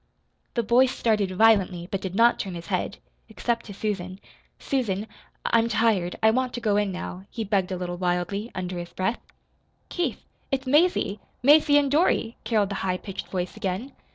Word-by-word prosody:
The 235 - +1
boy 245 +4 +5
started 215 -6 +1
violently, 190 -3 +3
but 195 -2 -2
did 190 -1 -5
not 235 +2 +4
turn 190 -3 -4
his 170 0 -7
head - - -1 0.3
except 235 -1 -2
to 205 - -7
Susan. 190 -3 -3 0.4
"Susan, 215 -7 -1 0.4
I 230 - +4
I'm 230 +1 +1
tired. 215 -6 +1
I 220 - +7
want 255 +1 0
to - - -3
go 215 -4 +1
in 205 -1 +1
now," 185 +1 -6
he 225 - -4
begged 195 -3 0
a 185 - -2
little 175 0 -4
wildly, 180 +4 -1
under 180 -1 -4
his 175 0 -6
breath. 190 +5 -1 0.7
"Keith, 325 - -2 0.2
it's 270 0 -1
Mazie 290 - +2 0.2
Mazie 295 +1 +6
and 285 -2 +2
Dorothy," 290 -7 +2
caroled 215 -3 +2
the 200 - -3
high 185 -1 0
pitched 195 +1 -7
voice 180 -1 -3
again. 215 +5 -3
210 Hz, 180 wpm, -25 LUFS, 185-240 Hz, 0.7 s, I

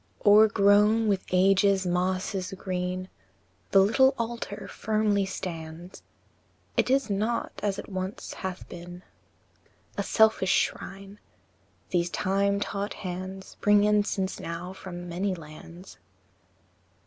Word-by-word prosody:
IV. - - -21
O'er 210 +1 +8
grown 210 +2 +4
with 195 -3 +1
age's 195 +1 +4
mosses 185 +1 -1
green, 185 0 -3 0.6
The 195 - +6
little 265 +7 +4
altar 230 -3 -4
firmly 215 -2 0
stands; 170 -1 -7 0.7
It - - +2
is 270 -4 +2
not, 215 +4 -1
as 200 -2 -1
it - - -7
once 190 0 -5
hath 190 -1 -6
been, 175 +1 -10 1.0
A - - +3
selfish 220 -4 +3
shrine; 195 +1 -1 0.7
these 175 -1 +1
time 200 +2 +1
taught 200 0 -3
hands 185 +1 -7
Bring 205 0 +5
incense 205 -2 +1
now 170 +2 -6
from 175 -2 -8
many 185 +3 -2
lands. 170 +3 -12
195 Hz, 115 wpm, -27 LUFS, 180-205 Hz, 1.0 s, O'er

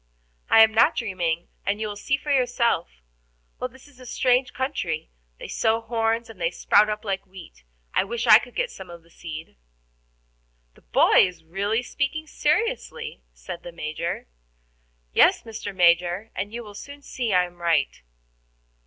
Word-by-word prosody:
"I 225 - +8
am 220 0 +3
not 220 - +5
dreaming, 175 -7 -2
and 205 +1 -1
you 220 - -2
will 205 - -5
see 270 +7 0
for 290 - -4
yourself. 245 - +1 0.7
Well, 255 - -2
this 260 +2 -18
is 280 -3 -20
a 255 - -12
strange 255 +2 +2
country. 180 - -3 0.3
They - - -8
sow 225 0 +1
horns, 225 0 -1
and 220 -6 -13
they 165 - +2
sprout 205 +4 +3
up 210 +1 -4
like 195 -1 -3
wheat. 185 - -13 0.3
I - - +3
wish 235 +3 -3
I 215 - +9
could 245 - -12
get - - -1
some 190 -2 -11
of 170 -1 -11
the 170 - -24
seed." 160 - -9 1.2
"The - - -22
boy - - +5
is 180 -2 -11
really 200 +8 -1
speaking 285 +5 -2
seriously," 460 +9 -1
said 175 -2 -8
the 175 - -9
Major. 165 +1 -4 0.9
"Yes, - - +5
Mr. 220 -3 -6
Major, 180 +3 +2
and 200 +2 -3
you 235 +1 -6
will 210 -2 -11
soon 285 +7 -10
see 245 -5 -3
I 180 -1 +4
am 175 0 -13
right." 165 - +1
215 Hz, 170 wpm, -24 LUFS, 175-245 Hz, 1.2 s, I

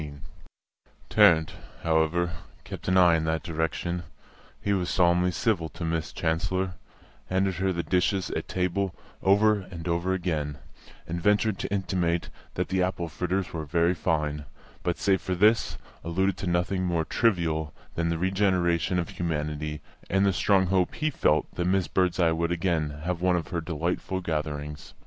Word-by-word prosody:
XV 75 -1 -6 1.0
Tarrant, 80 -2 +5 0.3
however, 85 +1 +2 0.3
kept - - -8
an 95 0 +3
eye 90 -2 +6
in 80 - 0
that 80 -1 -1
direction; 80 +2 -2 0.6
he 100 - 0
was 90 -3 0
solemnly 90 -1 +3
civil 90 -4 0
to 85 +1 -6
Miss 80 -1 -2
Chancellor, 95 +3 -1 0.5
handed 95 -1 0
her 95 +1 +1
the 85 -1 -2
dishes 90 +3 +1
at - - -3
table 90 0 -1 0.3
over 105 +2 +4
and 85 -2 -7
over 85 +2 0
again, 75 -5 -2 0.5
and 85 +1 -3
ventured 105 +1 +2
to - - -4
intimate 90 -4 0 0.3
that - - -1
the 95 0 +1
apple 90 -2 -1
fritters 90 +3 -2
were 80 -2 -3
very 85 +4 +2
fine; 75 -4 -1 0.4
but, 90 - -1
save 95 -1 +2
for 95 - -2
this, 105 +5 +3 0.3
alluded 95 +3 0
to 95 - -4
nothing 90 +2 0
more 85 -3 0
trivial 80 -9 +1 0.2
than 85 0 -1
the 85 - 0
regeneration 90 -2 +1
of 85 -2 -1
humanity 75 -2 -3 0.3
and 95 +1 +3
the 100 - +3
strong 95 0 +3
hope 90 -1 +1
he 155 0 0
felt 80 - +2
that 90 - -2
Miss 95 -2 +2
Birdseye 90 0 +2
would 85 +1 0
again 85 -3 0
have 90 0 -2
one 90 0 +3
of 85 -3 -2
her 85 -2 -2
delightful 85 +3 -2
gatherings. 75 -3 -4
85 Hz, 165 wpm, -27 LUFS, 80-95 Hz, 1.0 s, eye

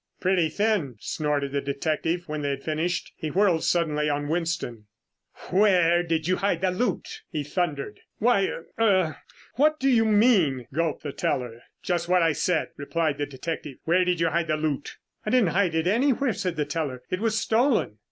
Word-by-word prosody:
"Pretty 180 -3 +2
thin!" 200 - 0
snorted 145 -2 -2
the 140 0 -1
detective 155 +5 -2
when 150 -1 -3
they 145 - -1
had 140 0 -3
finished. 160 +3 -2
He 155 - -4
whirled 180 -1 +2
suddenly 150 -3 +1
on 145 0 -2
Winston. 160 -10 -2 0.6
"Where 180 -3 +4
did 165 -2 -1
you 185 - +2
hide 195 -4 0
the 190 -1 +2
loot?" 215 +7 -2
he 150 - -3
thundered. 155 +3 -3 0.2
"Why 210 -4 +3
uh 165 - -5 0.2
er 185 -7 +2 0.4
what 305 +3 +3
do 270 - +1
you 240 -4 +4
mean?" 205 - +3
gulped 160 0 -1
the 145 - -4
teller. 120 -4 -2 0.2
"Just 175 -1 -1
what 180 -1 +4
I 165 - +4
said," 165 +2 0
replied 150 0 -1
the 145 - -1
detective. 145 0 -6
"Where 175 +3 +3
did 180 -2 0
you 165 0 +2
hide 170 0 0
the 155 -1 +1
loot?" 150 -2 -3 0.3
"I - - -3
didn't 235 -6 +3
hide 180 -2 +1
it 160 0 +1
anywhere," 250 +5 +2
said 185 -3 -3
the 150 -2 -1
teller. 145 -4 -3
"It 185 - -1
was 220 0 0
stolen." 225 - +1
165 Hz, 185 wpm, -25 LUFS, 150-190 Hz, 0.6 s, Where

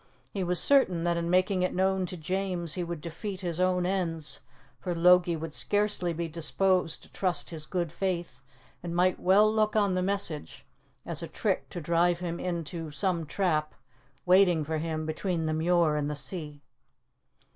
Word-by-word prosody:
He 195 - -2
was 180 0 0
certain 190 -12 +4
that 170 0 +1
in 170 0 -2
making 185 +1 +2
it 180 - 0
known 190 0 +1
to 180 - -6
James 180 0 -1
he 180 - -2
would 170 -2 -5
defeat 185 +4 -6
his 175 -2 -3
own 180 -1 +2
ends, 165 -5 -2 0.4
for 180 -2 -3
Logie 175 0 +5
would 160 -1 -6
scarcely 205 -3 0
be 170 0 -3
disposed 170 +2 0
to - - -16
trust 185 -2 +1
his 155 -2 -7
good 175 -4 -2
faith, 170 -7 -3 0.4
and 170 -1 -5
might 180 +1 +2
well 205 +4 +4
look 215 -1 +1
on 205 -3 +3
the 185 - 0
message 185 -5 -3 0.4
as - - -2
a - - -4
trick - - -2
to - - -5
drive 170 +2 +2
him 175 -1 -4
into 170 -2 -4
some 165 +2 -1
trap 155 -4 0 0.5
waiting 180 -3 +5
for 155 +1 -2
him 155 -1 -3
between 165 +1 -2
the 155 - 0
Muir 165 -1 +2
and 150 -1 -1
the 150 - -3
sea. 145 +1 -6
175 Hz, 180 wpm, -28 LUFS, 160-185 Hz, 0.5 s, Logie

